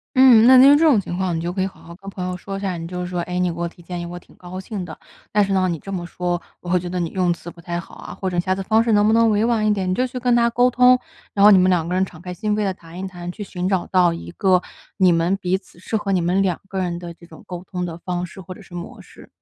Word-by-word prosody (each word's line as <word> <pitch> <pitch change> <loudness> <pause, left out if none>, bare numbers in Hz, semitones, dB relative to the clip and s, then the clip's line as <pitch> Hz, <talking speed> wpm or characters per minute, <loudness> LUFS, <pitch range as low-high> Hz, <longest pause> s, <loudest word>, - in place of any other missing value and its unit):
嗯， 250 -3 +7
那 260 0 +8
听 275 +3 +8
这 320 - +2
种 295 -9 +5
情 180 -3 -5
况， 180 -2 -1
你 - - -2
就 175 +1 -3
可 190 - -2
以 190 - +1
好 195 - -14
好 170 - -11
跟 195 +2 -10
朋 190 -2 -5
友 180 0 -3
说 195 +2 -6
一 - - -5
下。 195 -2 -2
你 165 0 -6
就 180 +1 -5
是 180 - -3
说： 180 0 -3
“哎， 180 - -2
你 180 -1 +1
给 170 - -8
我 170 - -1
提 175 - -14
建 175 0 -5
议， - - -5
我 175 +1 -7
挺 175 - -16
高 180 +1 -8
兴 190 0 -5
的， 160 -3 -9 0.3
但 210 0 +3
是 195 - -2
呢， 185 -1 +2
你 170 - -2
这 195 - -9
么 175 -2 -3
说， 175 -1 -2 0.2
我 175 - -8
会 180 +1 +3
觉 175 0 -6
得 180 0 -3
你 170 -2 -1
用 185 -2 +1
词 170 0 -10
不 170 - -16
太 170 +1 -4
好 175 - -12
啊， - - -9
或 190 - -4
者 175 -1 -1
下 185 +2 0
次 195 - -4
方 220 +3 +3
式 230 - 0
能 205 0 +4
不 215 - +3
能 230 0 +4
委 210 +1 +2
婉 230 -2 +1
一 - - +4
点？” 195 -3 -1
你 - - +1
就 255 +7 0
去 250 0 -6
跟 245 -1 +2
他 235 0 +3
沟 245 +2 +3
通， 250 +1 +6 0.4
然 200 - +2
后 210 - +9
你 195 - +7
们 185 +1 +4
两 170 -3 +1
个 180 - -3
人 185 +1 +2
敞 175 -4 -7
开 180 +1 -7
心 210 +3 -1
扉 210 - 0
地 195 -2 0
谈 170 -1 -12
一 190 - -4
谈， 175 -1 -7
去 205 +3 -7
寻 185 -2 -3
找 190 -3 0
到 180 -2 +3
一 170 - -7
个， 185 0 +2 0.4
你 185 -2 +5
们 170 +3 +1
彼 185 -1 0
此 190 - -20
适 185 +5 -5
合 205 -2 -3
你 190 - +2
们 180 +3 +1
两 185 -3 0
个 195 -1 -4
人 175 -2 -2
的 175 -1 -8
这 170 0 -17
种， 160 - -14
沟 180 -1 -7
通 180 -1 -4
的 165 -2 -6
方 180 0 -3
式 185 +2 -11
或 185 +1 -9
者 - - -14
是 - - -17
模 175 0 -8
式。 - - -16
185 Hz, 365 characters per minute, -21 LUFS, 175-205 Hz, 0.4 s, 后